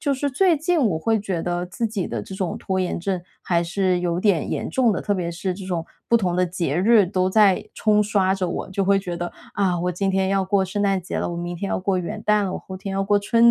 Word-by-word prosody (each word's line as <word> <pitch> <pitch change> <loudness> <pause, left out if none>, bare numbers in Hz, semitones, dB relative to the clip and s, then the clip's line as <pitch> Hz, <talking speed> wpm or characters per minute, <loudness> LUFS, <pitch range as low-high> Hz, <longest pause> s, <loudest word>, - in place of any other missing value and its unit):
就 285 -2 +1
是 285 +2 -1
最 345 +4 +3
近 330 +1 +1
我 170 -7 +1
会 220 +5 +1
觉 185 -5 -3
得 175 0 -1
自 225 +6 -2
己 210 -4 -3
的 115 -3 -3
这 190 - -8
种 185 -3 -2
拖 190 -1 -1
延 180 - -1
症 185 0 -2 0.2
还 170 -1 +1
是 180 +1 0
有 175 -1 -1
点 185 -5 +1
严 - - -2
重 250 -4 +3
的， 200 - -1
特 205 - 0
别 175 -2 -2
是 180 +2 -3
这 190 0 -8
种 175 -3 -2 0.2
不 235 - +4
同 180 -5 0
的 180 0 +2
节 170 -4 -2
日 210 +2 +5
都 185 +1 0
在 200 -2 +3
冲 210 -1 +3
刷 195 -2 +2
着 185 -2 -2
我， 180 - -4
就 195 0 0
会 200 +1 +4
觉 180 -3 -4
得， 175 0 -4 0.2
啊， 185 -3 +1
我 180 +1 0
今 195 +3 -1
天 190 0 +1
要 195 -1 +1
过 190 0 +2
圣 200 +3 -3
诞 195 -2 +1
节 - - -4
了， - - -1
我 - - -4
明 175 0 -4
天 195 +3 -4
要 - - 0
过 190 0 0
元 175 - -5
旦 210 -1 +3
了， 185 - -2
我 - - -3
后 190 - -8
天 195 +1 -6
要 195 0 0
过 205 +1 +3
春 230 +3 +4
190 Hz, 300 characters per minute, -23 LUFS, 180-205 Hz, 0.2 s, 日